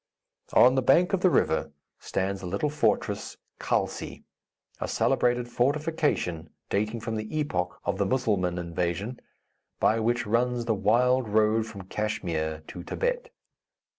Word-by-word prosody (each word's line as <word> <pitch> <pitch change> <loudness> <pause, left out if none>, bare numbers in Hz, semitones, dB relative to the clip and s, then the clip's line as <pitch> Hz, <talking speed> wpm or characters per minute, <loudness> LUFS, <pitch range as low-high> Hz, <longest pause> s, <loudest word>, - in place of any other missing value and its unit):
On 125 +1 +7
the 130 - +2
bank 170 +9 +4
of 195 - +3
the 185 - +5
river 80 - +1 0.3
stands 95 0 -2
the 90 - -5
little 100 +11 -1
fortress 150 - 0 0.2
Khalsi, - - -2 0.6
a - - -2
celebrated 120 0 +1
fortification 145 - 0 0.2
dating 110 +3 -1
from 115 0 -3
the 110 +8 -4
epoch 90 -12 -2
of - - -1
the - - +2
Musselman 100 -9 0
invasion, 85 +7 -3 0.6
by 110 - +3
which 120 +2 0
runs 120 +2 +1
the 115 - +2
wild 120 +4 +2
road 110 +1 +2
from 100 -4 -9
Kachmyr 80 -6 -3
to 90 - -8
Thibet. - - -2
110 Hz, 135 wpm, -27 LUFS, 95-125 Hz, 0.6 s, On